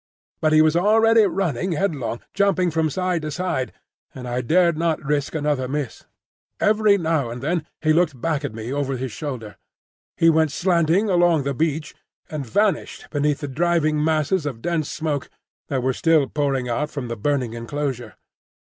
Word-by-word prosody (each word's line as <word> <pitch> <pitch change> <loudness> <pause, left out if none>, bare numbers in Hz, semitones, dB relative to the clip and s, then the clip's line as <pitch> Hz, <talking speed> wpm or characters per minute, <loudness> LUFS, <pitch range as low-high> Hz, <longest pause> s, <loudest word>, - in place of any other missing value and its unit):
But 155 - +2
he 155 0 +6
was 155 0 +3
already 220 +4 +5
running 180 -2 -1
headlong, 145 -10 -2
jumping 185 -3 +2
from 160 0 +1
side 180 +2 -1
to 155 - -4
side, 150 -4 -2 0.4
and 125 -2 -7
I 125 +1 -1
dared 170 +6 +3
not 165 0 0
risk 145 +1 -1
another 145 -4 0
miss. 140 -2 -4 0.5
Every 210 -1 +4
now 160 -7 0
and 120 +1 -6
then 155 +4 -2 0.2
he 155 -1 +4
looked 160 -6 +1
back 150 +2 -1
at 140 - -3
me 115 +3 -5
over 140 -2 -1
his 130 0 -4
shoulder. 115 -4 -6 0.6
He 165 - +4
went 160 -2 +4
slanting 175 +4 +2
along 175 -5 +3
the 140 +1 -1
beach, 155 +2 -1 0.4
and 150 -2 -3
vanished 205 - -1
beneath 145 0 0
the 145 - -3
driving 155 +1 +1
masses 155 +1 +1
of 130 -6 -5
dense 170 -3 -1
smoke 150 -4 -3 0.4
that 130 -3 -2
were 130 0 +1
still 160 0 +3
pouring 135 -4 -1
out 145 +6 -1
from 140 -5 -5
the 115 - -4
burning 125 0 -1
enclosure. 120 -1 -4
155 Hz, 175 wpm, -22 LUFS, 135-170 Hz, 0.6 s, he